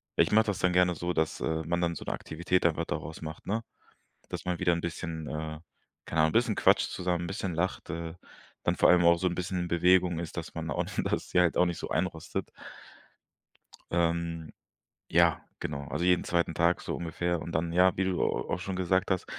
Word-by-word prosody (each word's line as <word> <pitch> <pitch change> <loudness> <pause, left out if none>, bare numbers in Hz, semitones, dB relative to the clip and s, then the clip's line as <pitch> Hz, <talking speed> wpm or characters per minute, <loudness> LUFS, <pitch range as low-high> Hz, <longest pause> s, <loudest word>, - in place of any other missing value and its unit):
ich - - +3
mache 110 +1 +5
das 100 - -1
dann 90 -1 +2
gerne 90 -1 +4
so, 85 +2 -2
dass, 80 0 0
äh, 80 0 -1
man 85 +1 0
dann 85 -1 0
so - - -7
'ne - - -2
Aktivität 85 +3 -1
einfach 85 0 +2
daraus 80 - -5
macht, 80 0 -7
ne? 110 +3 -1 0.7
Dass - - -5
man 90 -1 -1
wieder 90 -2 +3
'n 85 - -2
bisschen, 80 -2 -4
äh 80 0 -4 0.5
keine 80 -1 +1
Ahnung, 80 - +3
'n - - -9
bisschen 115 -2 +3
quatscht - - +4
zusammen, 90 -1 -1
bisschen 95 -2 -3
lacht, 90 +3 -2
äh, 85 0 -4 0.5
dann - - +1
vor - - +5
allem 90 -1 +6
auch 85 0 +6
so 95 - +1
'n 85 - -1
bisschen 90 -1 -2
Bewegung 90 0 +3
ist, 85 -2 -6
dass - - -5
man - - -4
da - - -1
auch - - 0 0.2
dass - - -2
sie 90 - +3
halt 90 -2 +3
auch 90 - +5
nicht 85 -2 -2
so - - -6
einrostet. 80 -4 -2 1.4
Ähm, 85 -1 0 0.6
ja, 85 -2 +4 0.2
genau. 70 -2 -4
Also, 85 +4 -2
jeden 90 -1 +4
2. 85 -1 0
Tag 85 +2 +2
so - - -3
ungefähr 85 0 -2
und 85 - -6
dann, 85 +1 0
ja, 90 +1 +4
wie 95 - +2
du 90 -2 0
a - - +3 0.3
auch - - -1
schon 95 +1 -4
gesagt 95 +1 +1
hast: 95 - 0
85 Hz, 220 wpm, -29 LUFS, 80-90 Hz, 1.4 s, allem